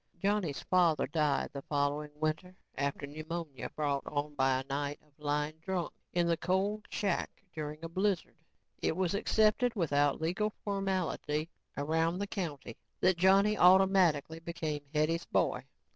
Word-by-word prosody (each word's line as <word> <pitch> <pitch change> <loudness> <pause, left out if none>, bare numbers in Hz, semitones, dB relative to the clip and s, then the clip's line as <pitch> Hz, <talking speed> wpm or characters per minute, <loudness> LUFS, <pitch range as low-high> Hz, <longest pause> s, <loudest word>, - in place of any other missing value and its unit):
Johnny's 195 -5 0
father 175 -4 +3
died 150 -4 0
the 140 - -5
following 145 +1 -1
winter 155 +4 -2 0.2
after 140 +1 -2
pneumonia 155 -2 -5
brought 145 -2 -1
on 150 0 -2
by 130 -2 +2
a - - -4
night 140 +1 -3
of 150 - -30
lying 150 +1 -1
drunk 180 0 -2 0.2
in 175 -1 +2
the 170 0 +2
cold 195 +5 0
shack 200 -1 -2
during 150 0 -5
a - - -3
blizzard. 190 +1 0 0.5
It 160 - 0
was 185 -1 +1
accepted 220 +3 +2
without 145 -6 +2
legal 185 +7 0
formality 185 -6 -1 0.3
around 160 +4 +1
the 200 - -1
county 160 - -5 0.2
that 185 -1 +3
Johnny 195 +3 +5
automatically 180 -5 +5
became 165 -3 -3
Hetty's 155 +2 +1
boy. - - 0
165 Hz, 145 wpm, -32 LUFS, 150-190 Hz, 0.5 s, Johnny